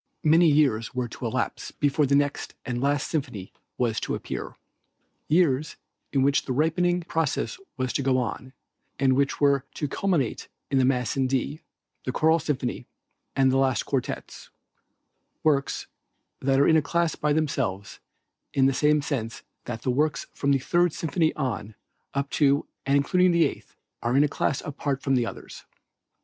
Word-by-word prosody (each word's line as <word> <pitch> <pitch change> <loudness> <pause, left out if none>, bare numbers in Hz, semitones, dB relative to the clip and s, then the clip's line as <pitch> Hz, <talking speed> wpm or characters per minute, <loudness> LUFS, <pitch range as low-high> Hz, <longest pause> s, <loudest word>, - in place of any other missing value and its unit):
Many 165 +3 +5
years 135 -7 +2
were 125 -1 -1
to - - -5
elapse - - -2
before 145 0 +1
the 140 - +3
next 145 0 0
and 120 -2 -2
last 140 +1 +1
symphony 125 - -4 0.2
was 115 -3 0
to - - -2
appear; - - -6 0.7
years 155 -3 +2 0.4
in 135 -2 +2
which 140 +1 +2
the 130 - -2
ripening 175 +5 +1
process 165 - -2 0.2
was 130 -1 -1
to - - 0
go 130 -1 +2
on, 130 +2 -3 0.4
and 135 -1 +3
which 140 +1 +1
were 140 -2 +3
to 150 - -2
culminate 160 - -1 0.2
in 135 - +3
the 130 - +4
Mass 125 -3 +1
in 135 -1 +1
D, 135 +4 -2 0.4
the 130 - -2
Choral 160 +5 +3
Symphony 135 -5 -3 0.5
and 135 -1 +4
the 135 - +2
last 135 -2 +2
quartets, 135 -3 -4 0.9
works 140 -3 +1 0.5
that 135 0 +2
are 140 - +5
in 160 - +6
a - - +4
class 170 +2 0
by 150 - 0
themselves 125 -10 -1 0.6
in 135 - +4
the 135 - +3
same 150 +2 +3
sense 115 -6 -3 0.2
that 115 -2 -5
the 130 - +1
works 150 +4 0
from 140 - 0
the 140 - +4
Third 175 +5 +1
Symphony 160 0 0
on, 110 -7 -3 0.4
up 140 0 -1
to, 140 -1 +3 0.2
and 140 +1 +4
including 180 +6 +3
the 170 -1 +4
Eighth, - - -6 0.3
are 120 +3 +1
in 145 - +6
a - - +3
class 140 -1 -1
apart 140 -2 -3
from 135 - +1
the 120 -3 +2
others. - - -9
140 Hz, 170 wpm, -26 LUFS, 130-150 Hz, 0.9 s, in